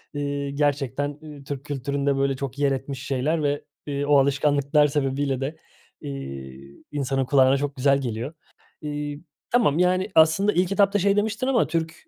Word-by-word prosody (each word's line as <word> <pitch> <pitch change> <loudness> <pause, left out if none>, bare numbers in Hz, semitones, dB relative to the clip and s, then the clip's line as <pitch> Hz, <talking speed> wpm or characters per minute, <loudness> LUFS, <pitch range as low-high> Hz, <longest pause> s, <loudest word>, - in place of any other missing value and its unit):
ııı, 140 -1 -2
gerçekten, 145 0 -1
ııı, 145 -2 -10
Türk 140 0 -6
kültüründe 140 0 -1
böyle 135 0 +1
çok 140 +1 -6
yer 140 -1 +2
etmiş 135 0 -4
şeyler 150 +4 0
ve, 145 0 -1 0.2
eee, 145 -1 -2
o 145 -1 +5
alışkanlıklar 140 +2 +3
sebebiyle 135 -2 -1
de, 145 +4 -3 0.4
eee, 70 0 -8
insanın 135 -2 -1
kulağına 135 0 +4
çok 145 0 -3
güzel 140 +1 +2
geliyor. 120 +4 -4 0.5
İii, 145 0 -5 0.3
tamam, 210 -11 +3
yani 185 +1 +2
aslında 160 +6 +5
ilk 180 +2 +1
etapta 200 0 +3
şey 200 +2 +3
demiştin 220 +4 0
ama 250 -4 +2
Türk 165 -1 -2
145 Hz, 160 wpm, -24 LUFS, 135-155 Hz, 0.5 s, o